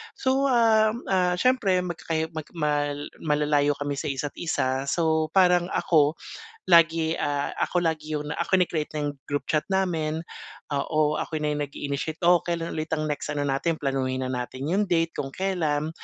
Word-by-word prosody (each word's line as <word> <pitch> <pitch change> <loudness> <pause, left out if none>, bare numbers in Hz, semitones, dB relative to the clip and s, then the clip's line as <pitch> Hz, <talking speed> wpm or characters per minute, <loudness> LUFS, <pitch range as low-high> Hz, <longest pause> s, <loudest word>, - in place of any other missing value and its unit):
So, 265 +1 +1
ah, 225 -3 +4 0.2
ah, 180 -2 +2
siyempre, 200 -5 +2
magkakayo 160 -2 -3
mag 155 - -5 0.7
malalayo 150 -1 +2
kami 145 -1 -2
sa - - -5
isa't 140 +1 -3
isa, 135 -5 -1
so 160 0 +1
parang 180 -2 +5
ako 150 -2 +3 0.5
lagi, 165 -2 +5
ah, 145 -1 -1
ako 180 - -1
lagi 155 -1 -1
yung, 150 - -6
ah, 170 - -1
kini-create 175 -5 +1
ko 155 - -5
yung 145 - -3 0.2
group 145 0 -2
chat 155 -1 +1
namin. 165 -5 0 0.5
Oo, 150 +1 +1
ako 155 -2 -3
na 150 - 0
yung 145 0 -1
nag-i-initiate, 145 +3 -4
oh, 175 -1 +4
kailan 170 -1 -2
ulit 155 +1 -4
ang 155 -1 -1
next 150 0 -3
ano 145 - -2
natin, 155 +4 0
planuhin 130 -1 -1
na - - -4
natin 130 +2 -4
yung 200 +3 +2
date 165 -2 +1
kung 135 -1 -4
kailan. 160 -6 -1
155 Hz, 170 wpm, -25 LUFS, 145-175 Hz, 0.7 s, parang